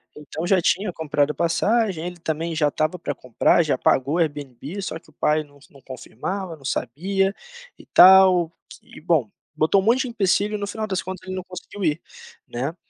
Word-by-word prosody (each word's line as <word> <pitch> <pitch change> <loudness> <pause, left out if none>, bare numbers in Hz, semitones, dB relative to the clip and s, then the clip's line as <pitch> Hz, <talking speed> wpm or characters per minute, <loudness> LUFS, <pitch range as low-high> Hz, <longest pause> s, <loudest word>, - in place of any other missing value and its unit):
então 150 +3 -6
já 185 0 +3
tinha 190 +3 +1
comprado 150 -2 0
passagem, 190 +1 0
ele 180 0 -7
também 165 +1 -3
já 150 -2 +2
estava 155 +4 -2
para - - -4
comprar, 125 +7 +2
já 155 - 0
pagou 140 +6 +1
Airbnb 145 +2 -3
só 165 -3 -5
que 155 - -24
o - - -23
pai 155 +2 +1
não 145 0 -22
não 140 - -18
confirmava, 165 - -6
não 135 - -17
sabia, 195 +12 -1 0.5
e - - -15
tal, 185 -2 +7 0.3
e - - -15
bom, 155 - +1 0.3
botou 160 +6 +3
um - - -6
monte 240 +4 +3
de - - -2
empecilho 205 -1 +1
e - - -1
no 200 - -3
final 215 +1 -4
das 190 -2 -2
contas 185 -1 -8
ele 185 - -4
não 185 - -4
conseguiu 185 +2 -9
ir, 155 0 0 0.5
né, 135 +7 -4
170 Hz, 195 wpm, -22 LUFS, 150-190 Hz, 0.5 s, tal